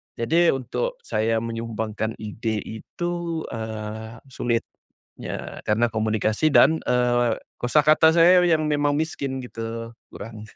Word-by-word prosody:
jadi 165 Hz, +6 st, +3 dB
untuk -, -, -3 dB
saya 110 Hz, +1 st, 0 dB
menyumbangkan 110 Hz, -1 st, -3 dB
ide 110 Hz, 0 st, -4 dB
itu 170 Hz, +8 st, -4 dB
eee, 110 Hz, 0 st, -6 dB, 0.2 s
sulit 120 Hz, -2 st, -1 dB, 0.6 s
ya -, -, -6 dB
karena 110 Hz, +3 st, +2 dB
komunikasi 110 Hz, +5 st, 0 dB
dan 160 Hz, +3 st, +5 dB
eee, 120 Hz, -1 st, +1 dB, 0.2 s
kosakata 155 Hz, +5 st, +5 dB
saya 175 Hz, +2 st, +6 dB
yang 160 Hz, -3 st, +2 dB
memang 145 Hz, -1 st, +1 dB
miskin 140 Hz, -4 st, -3 dB
gitu, 115 Hz, -1 st, -6 dB, 0.2 s
kurang 110 Hz, 0 st, -9 dB
115 Hz, 115 wpm, -24 LUFS, 110-155 Hz, 0.6 s, saya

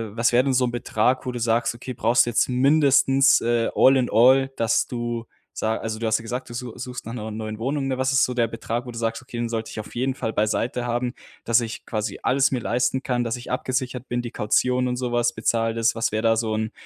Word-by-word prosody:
was 115 Hz, +1 st, +2 dB
wäre 125 Hz, +1 st, +4 dB
denn 135 Hz, -, 0 dB
so 125 Hz, 0 st, +3 dB
'n 120 Hz, -, -2 dB
Betrag, 120 Hz, +2 st, 0 dB
wo 125 Hz, -, -2 dB
du 120 Hz, -, -5 dB
sagst: 115 Hz, +1 st, +1 dB
„Okay, 125 Hz, +2 st, -7 dB
brauchst 120 Hz, +2 st, +3 dB
du -, -, +1 dB
jetzt 120 Hz, -, +2 dB
mindestens, 135 Hz, 0 st, +4 dB
äh, 115 Hz, 0 st, +1 dB
all 135 Hz, 0 st, +5 dB
in 125 Hz, -, 0 dB
all,“ 130 Hz, +4 st, +5 dB
dass 115 Hz, 0 st, +2 dB
du 120 Hz, -1 st, -4 dB, 0.3 s
sa 110 Hz, +1 st, -1 dB
also, 110 Hz, -1 st, -4 dB
du 115 Hz, -, -4 dB
hast 110 Hz, +1 st, +2 dB
ja -, -, -9 dB
gesagt, 120 Hz, +2 st, -5 dB
du -, -, -7 dB
su 120 Hz, -1 st, -6 dB
suchst 125 Hz, -2 st, -7 dB
nach 115 Hz, -, -6 dB
'ner 110 Hz, -2 st, -5 dB
neuen 110 Hz, 0 st, -5 dB
Wohnung, 135 Hz, +3 st, -2 dB
was 130 Hz, 0 st, 0 dB
ist 135 Hz, -, +4 dB
so 125 Hz, -, -4 dB
der 120 Hz, -2 st, +2 dB
Betrag, 115 Hz, +2 st, -4 dB
wo 125 Hz, -, -7 dB
du 115 Hz, -, -7 dB
sagst: 115 Hz, +2 st, -2 dB
„Okay, 120 Hz, -, -9 dB
den 120 Hz, -1 st, -2 dB
sollte 115 Hz, -1 st, -4 dB
ich -, -, -6 dB
auf 110 Hz, -, -9 dB
jeden 130 Hz, +2 st, 0 dB
Fall 115 Hz, -3 st, -4 dB
beiseite 120 Hz, +3 st, -1 dB
haben, 120 Hz, +1 st, -2 dB, 0.3 s
dass 115 Hz, +1 st, +3 dB
ich 115 Hz, -1 st, -6 dB
quasi 105 Hz, -2 st, -3 dB
alles 135 Hz, +1 st, +2 dB
mir 130 Hz, -, 0 dB
leisten 125 Hz, +3 st, 0 dB
kann, 125 Hz, -2 st, -1 dB
dass 115 Hz, +1 st, -2 dB
ich 120 Hz, -, -10 dB
abgesichert 125 Hz, 0 st, -3 dB
bin, 120 Hz, 0 st, -2 dB
die 120 Hz, -, -6 dB
Kaution 125 Hz, +4 st, +1 dB
und 125 Hz, 0 st, -2 dB
sowas 120 Hz, -1 st, 0 dB
bezahlt 115 Hz, +1 st, 0 dB
ist.” 115 Hz, 0 st, +2 dB
Was 115 Hz, -1 st, 0 dB
wäre 110 Hz, 0 st, -1 dB
da 115 Hz, -1 st, +3 dB
so 110 Hz, -1 st, -1 dB
'n, 110 Hz, +1 st, -2 dB
120 Hz, 255 wpm, -23 LUFS, 115-125 Hz, 0.3 s, all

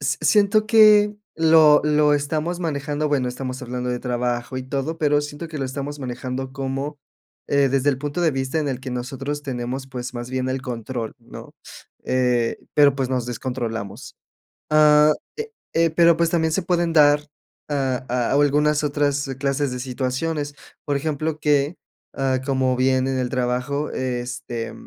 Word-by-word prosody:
s 140 Hz, 0 st, -1 dB
s 160 Hz, -, 0 dB
siento 210 Hz, +1 st, +3 dB
que 210 Hz, -2 st, +6 dB, 0.2 s
lo 160 Hz, -2 st, +6 dB
lo 150 Hz, -1 st, +3 dB
estamos 155 Hz, +4 st, -1 dB
manejando 150 Hz, -1 st, -2 dB
bueno, 135 Hz, -4 st, +1 dB
estamos 130 Hz, +1 st, -5 dB
hablando 125 Hz, 0 st, -3 dB
de 125 Hz, -, -2 dB
trabajo 125 Hz, 0 st, -2 dB
y 130 Hz, -, -5 dB
todo, 140 Hz, +5 st, -3 dB
pero 145 Hz, -1 st, +3 dB
siento 145 Hz, +3 st, -7 dB
que 155 Hz, -, -6 dB
lo 135 Hz, -, -2 dB
estamos 140 Hz, +2 st, -5 dB
manejando 130 Hz, +1 st, -5 dB
como, 140 Hz, +1 st, -4 dB, 0.5 s
eh, 140 Hz, -1 st, +3 dB
desde 135 Hz, +2 st, +2 dB
el 130 Hz, -, -3 dB
punto 145 Hz, +4 st, -3 dB
de 165 Hz, -, +4 dB
vista 130 Hz, +3 st, -2 dB
en 150 Hz, -2 st, -1 dB
el 130 Hz, -1 st, -3 dB
que 130 Hz, -, -6 dB
nosotros 135 Hz, +4 st, -4 dB
tenemos, 130 Hz, 0 st, -4 dB
pues, 125 Hz, -1 st, -6 dB
más 120 Hz, 0 st, -5 dB
bien 130 Hz, 0 st, -2 dB
el 130 Hz, 0 st, -3 dB
control, 120 Hz, -1 st, -5 dB
¿no?, 120 Hz, 0 st, -12 dB, 0.5 s
eh, 125 Hz, -2 st, +1 dB, 0.2 s
pero, 145 Hz, -2 st, +5 dB
pues, 135 Hz, -2 st, -1 dB
nos 125 Hz, -2 st, -1 dB
descontrolamos, 120 Hz, -3 st, -5 dB, 0.6 s
ah, 150 Hz, 0 st, +6 dB, 0.3 s
eh 450 Hz, 0 st, -5 dB, 0.2 s
eh, 165 Hz, 0 st, +3 dB
pero, 170 Hz, +1 st, +5 dB
pues, 170 Hz, -1 st, +2 dB
también 160 Hz, -2 st, +1 dB
se 195 Hz, -, +1 dB
pueden 175 Hz, -2 st, 0 dB
dar 145 Hz, -1 st, +6 dB, 0.5 s
a 135 Hz, -3 st, -1 dB
a 120 Hz, -1 st, 0 dB
algunas 145 Hz, +1 st, +3 dB
otras 145 Hz, -1 st, 0 dB
clases 140 Hz, 0 st, 0 dB
de 125 Hz, -, -4 dB
situaciones, 140 Hz, +4 st, -3 dB, 0.3 s
por 145 Hz, -1 st, 0 dB
ejemplo, 155 Hz, +1 st, -2 dB
que, 150 Hz, +2 st, +1 dB, 0.4 s
ah, 135 Hz, -1 st, 0 dB
como 130 Hz, -1 st, +1 dB
bien 130 Hz, 0 st, +2 dB
en 135 Hz, -1 st, -1 dB
el 125 Hz, -1 st, -1 dB
trabajo, 125 Hz, +3 st, -1 dB
este, 125 Hz, -2 st, -4 dB
140 Hz, 170 wpm, -22 LUFS, 130-150 Hz, 0.6 s, que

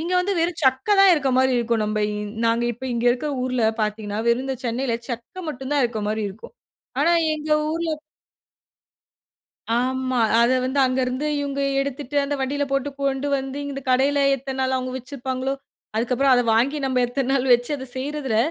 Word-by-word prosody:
இங்க 340 Hz, +3 st, -3 dB
வந்து 380 Hz, +2 st, +1 dB
வெறும் 335 Hz, 0 st, 0 dB
சக்க 260 Hz, +4 st, +2 dB
தான் 390 Hz, -1 st, +8 dB
இருக்க 275 Hz, -3 st, 0 dB
மாரி 260 Hz, 0 st, +4 dB
இருக்கும். 230 Hz, -2 st, 0 dB
நம்ப 215 Hz, 0 st, -1 dB
இந் 210 Hz, 0 st, -4 dB, 0.2 s
நாங்க 230 Hz, +1 st, +2 dB
இப்ப 240 Hz, +3 st, -10 dB
இங்க 235 Hz, 0 st, -2 dB
இருக்குற 255 Hz, +5 st, -1 dB
ஊர்ல 255 Hz, -2 st, -1 dB, 0.2 s
பார்த்தீங்கனா, 210 Hz, -1 st, -2 dB
வெறும் 240 Hz, +3 st, +2 dB
இந்த 265 Hz, -1 st, -2 dB
சென்னைல 235 Hz, 0 st, -1 dB
சக்க 240 Hz, +10 st, -6 dB
மட்டும் 265 Hz, -1 st, -5 dB
தான் 290 Hz, -2 st, +3 dB
இருக்க 230 Hz, -2 st, -2 dB
மாரி 215 Hz, +1 st, -1 dB
இருக்கும். 210 Hz, -, -12 dB, 0.5 s
ஆனா 335 Hz, +4 st, +4 dB, 0.2 s
எங்க 305 Hz, 0 st, -6 dB, 0.2 s
ஊர்ல 330 Hz, 0 st, -1 dB, 1.9 s
ஆமா. 255 Hz, 0 st, 0 dB, 0.2 s
அத 235 Hz, -, +4 dB
வந்து 265 Hz, +2 st, -1 dB
அங்கருந்து 255 Hz, +2 st, -1 dB
இவங்க 280 Hz, -1 st, -3 dB, 0.2 s
எடுத்துட்டு 280 Hz, 0 st, -4 dB
அந்த 285 Hz, +1 st, -2 dB
வண்டில 285 Hz, +2 st, 0 dB
போட்டு 275 Hz, +1 st, 0 dB
கொண்டு 275 Hz, 0 st, 0 dB
வந்து, 270 Hz, +1 st, -5 dB
இந்த -, -, -4 dB
இந்த 275 Hz, -, -5 dB
கடைல 275 Hz, +3 st, +3 dB, 0.2 s
எத்தன 270 Hz, 0 st, -6 dB
நாளா 260 Hz, 0 st, +1 dB
அவங்க 255 Hz, 0 st, -4 dB
வச்சிருப்பாங்களோ? 260 Hz, +1 st, -3 dB, 0.4 s
அதுக்கப்புறம் 250 Hz, +4 st, +2 dB
அத 245 Hz, -, +3 dB
வாங்கி 265 Hz, +7 st, +2 dB
நம்ம 260 Hz, -1 st, +1 dB
எத்தன 265 Hz, +1 st, -2 dB
நாள் 265 Hz, -1 st, +1 dB
வச்சு 245 Hz, +3 st, -2 dB
அத 260 Hz, -, -7 dB
செய்றதில, 270 Hz, -3 st, -2 dB
260 Hz, 180 wpm, -23 LUFS, 245-280 Hz, 1.9 s, தான்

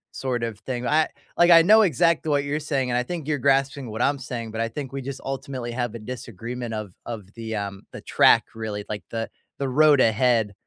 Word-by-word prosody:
sort 125 Hz, -3 st, -2 dB
of 110 Hz, -3 st, -4 dB
thing. 125 Hz, 0 st, -4 dB
I 155 Hz, +3 st, +3 dB, 0.3 s
like, 175 Hz, 0 st, +5 dB
I 165 Hz, -1 st, +9 dB
know 215 Hz, +4 st, +7 dB
exactly 165 Hz, -, +2 dB
what 145 Hz, -1 st, +2 dB
you're 145 Hz, +2 st, -2 dB
saying, 135 Hz, -4 st, -1 dB
and 120 Hz, -, +1 dB
I 125 Hz, -, +2 dB
think 165 Hz, -1 st, -6 dB
you're 145 Hz, -2 st, 0 dB
grasping 135 Hz, -1 st, +1 dB
what 110 Hz, +2 st, -4 dB
I'm 140 Hz, 0 st, +1 dB
saying, 120 Hz, -4 st, -6 dB
but 110 Hz, -, -3 dB
I 115 Hz, -, 0 dB
think 135 Hz, +2 st, -6 dB
we 135 Hz, -, -4 dB
just 135 Hz, 0 st, -6 dB
ultimately 130 Hz, -2 st, -4 dB
have 120 Hz, -1 st, -3 dB
a -, -, -6 dB
disagreement 120 Hz, 0 st, -6 dB
of 105 Hz, -3 st, -5 dB
of 105 Hz, -4 st, -7 dB
the, 115 Hz, -1 st, -5 dB
um, 100 Hz, -1 st, -4 dB
the -, -, -8 dB
track, -, -, +5 dB
really, 105 Hz, -2 st, -5 dB
like, 105 Hz, -4 st, -4 dB
the 115 Hz, -1 st, -3 dB, 0.3 s
the 140 Hz, -, -1 dB
road 150 Hz, +1 st, +5 dB
ahead, 115 Hz, -2 st, +2 dB
125 Hz, 225 wpm, -24 LUFS, 115-140 Hz, 0.3 s, I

